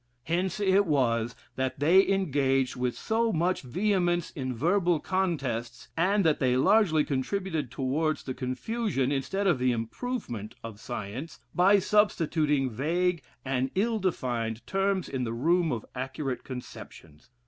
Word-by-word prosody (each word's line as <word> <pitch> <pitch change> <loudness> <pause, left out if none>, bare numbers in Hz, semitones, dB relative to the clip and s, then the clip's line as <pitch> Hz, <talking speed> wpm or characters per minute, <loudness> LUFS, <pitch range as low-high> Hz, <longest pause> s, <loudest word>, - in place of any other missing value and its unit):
Hence 175 +5 -1
it 200 -1 +3
was 120 -5 +1 0.2
that 130 0 -2
they 175 +7 +5
engaged 135 -9 +1
with 125 -1 -2
so 225 +1 0
much 180 +1 0
vehemence 175 - 0
in 130 -3 -4
verbal 175 - +2
contests, 135 -12 -2
and 195 +3 +2
that 155 -2 +3
they 125 -1 +2
largely 160 0 +4
contributed 155 - -2
towards 140 +5 -1
the 130 - -4
confusion, 135 - -2
instead 170 +9 -1
of 175 -9 +3
the 125 0 +2
improvement, 115 - -4
of 115 -2 -8
science, 120 +5 -6
by 190 +3 +5
substituting 160 - +2
vague 170 +8 0 0.2
and 130 0 0
ill 220 +3 +1
defined 120 - -2
terms 195 -1 0
in 130 -2 -3
the 115 -1 -2
room 165 +7 +2
of 115 -4 -3
accurate 130 0 -4
conceptions. 105 - -10
150 Hz, 135 wpm, -28 LUFS, 125-185 Hz, 0.2 s, they